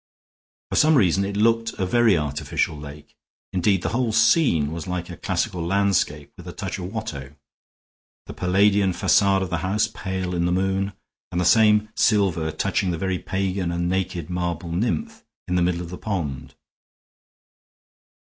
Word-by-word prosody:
For - - 0
some 155 +1 +5
reason 95 - +3
it 100 +1 -3
looked 115 +1 +2
a 95 - -2
very 110 0 +3
artificial 75 +1 -2
lake; 75 0 -11 0.4
indeed, 95 0 +1
the 85 - 0
whole 120 +3 0
scene 110 - +3
was 80 0 -6
like 90 -1 -4
a - - -7
classical 90 -1 -2
landscape 90 -5 0
with - - -12
a - - -7
touch - - -5
of 90 +1 -6
Watteau; 75 - -6 0.9
the - - -8
Palladian 95 +1 +2
facade 95 +1 +3
of 95 - -6
the 85 - 0
house 95 +4 0
pale 95 -2 -4
in 85 -1 0
the - - 0
moon, 95 +2 0 0.4
and 85 - -1
the 90 - +1
same 105 +2 +4
silver 95 -7 +2
touching 95 +4 -1
the 85 - -1
very 95 +1 -2
pagan 95 -2 -2
and 85 0 -1
naked 90 -3 -2
marble 85 -1 -3
nymph 220 - -2 0.2
in 90 - -2
the 90 - +2
middle 85 0 0
of 85 0 -8
the 90 - -7
pond. 70 -10 -4
95 Hz, 165 wpm, -23 LUFS, 85-100 Hz, 0.9 s, some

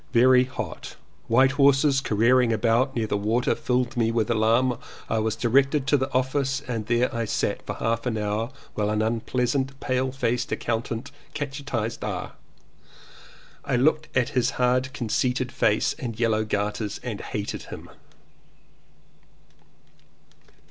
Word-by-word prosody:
Very 125 +1 +6
hot. 130 - -7 0.3
White 130 +4 +4
horses 140 0 +4
careering 120 +1 +3
about 115 +4 +2
near 115 -2 0
the 105 - -1
water 115 +4 +1
filled 125 -1 -1
me 115 -2 +1
with 115 0 0
alarm. 115 +3 +2 0.3
I 110 - 0
was 110 0 0
directed 135 +3 +2
to 135 - +3
the 130 0 -1
ofiftce 135 +2 -1
and 115 -4 -3
there 120 +1 +1
I 115 -1 -1
sat - - -1
for - - -3
half 115 +2 -1
an 115 -3 -1
hour 105 +2 -1 0.2
while 105 -1 -1
an 105 0 +1
unpleasant 125 +4 -1
pale 130 0 -1
faced 125 -2 -1
accountant 115 +2 -3 0.2
cate 145 -2 -3 0.2
chised 115 -4 -2
R. - - -4 1.3
I 140 -3 -1
looked 155 +5 +2
at 125 - +2
his 125 -2 +1
hard 125 +1 +2
conceited 125 0 -1
face 105 - +2
and 115 -3 -5
yellow 110 -2 +2
gaiters 105 0 -2
and 115 -5 -4
hated 105 -1 -4
him. - - -8
120 Hz, 140 wpm, -25 LUFS, 115-130 Hz, 1.3 s, Very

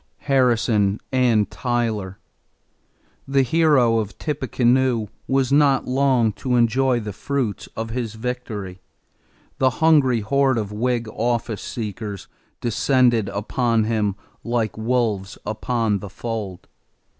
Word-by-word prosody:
=Harrison 115 -6 +2
and 120 -5 +3
Tyler.= 110 -6 -2 1.1
The 135 0 +3
Hero 130 -5 +3
of 105 -2 -5
Tippecanoe 130 -5 +1 0.2
was 135 -1 +1
not 140 -2 +3
long 130 -3 +2
to 125 -2 0
enjoy 120 +2 +2
the 105 -2 -6
fruits 110 +1 -3
of 110 0 -4
his 115 -2 -3
victory. 110 -6 -5 0.8
The 130 - +4
hungry 145 -7 +4
horde 135 +4 +2
of 105 -2 -3
Whig 120 +2 -1
office 115 -1 -2
seekers 105 -3 -6 0.3
descended 120 -2 +2
upon 115 +2 0
him 105 -3 0 0.3
like 115 -3 -1
wolves 110 -4 -1
upon 110 -1 -1
the 100 - -8
fold. 105 -3 -6
120 Hz, 110 wpm, -22 LUFS, 105-130 Hz, 1.1 s, The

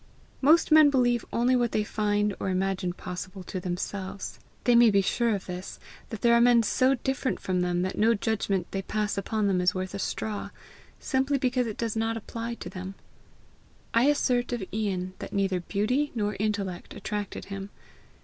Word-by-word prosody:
Most 310 +4 +5
men 310 -1 +8
believe 245 -4 +2
only 245 +2 +2
what 240 -2 +1
they 215 - +2
find 210 -1 0
or - - -2
imagine 185 0 0
possible 185 +1 -7
to 185 - -5
themselves. 190 +2 -5 0.2
They 245 - +4
may 235 -1 +7
be 200 -2 +3
sure 230 +2 +1
of 195 - -6
this, 180 0 -7 0.3
that 220 - -6
there 235 0 +5
are 235 - +5
men 240 -1 +6
so 260 +5 +3
different 265 +1 -2
from 185 -1 -1
them 180 0 0
that 185 - -3
no 225 +2 +4
judgment 200 -3 -1
they 195 - -2
pass 210 +2 -2
upon 210 +2 -1
them 190 -2 +2
is 180 +1 +2
worth 185 -1 -3
a - - -4
straw, 210 +1 -3 0.5
simply 270 +1 +1
because 250 -2 +1
it 215 - -5
does 230 -2 -2
not 225 0 0
apply 230 +1 -5
to - - -8
them. 185 +1 -7 1.0
I 230 +2 +4
assert 250 -4 +2
of 240 -4 -2
Ian 190 -4 -2
that - - -7
neither 195 -2 +1
beauty 215 +11 0
nor 210 -2 -1
intellect 200 -4 -2
attracted 210 -2 -4
him. 195 0 -6
210 Hz, 185 wpm, -27 LUFS, 190-240 Hz, 1.0 s, men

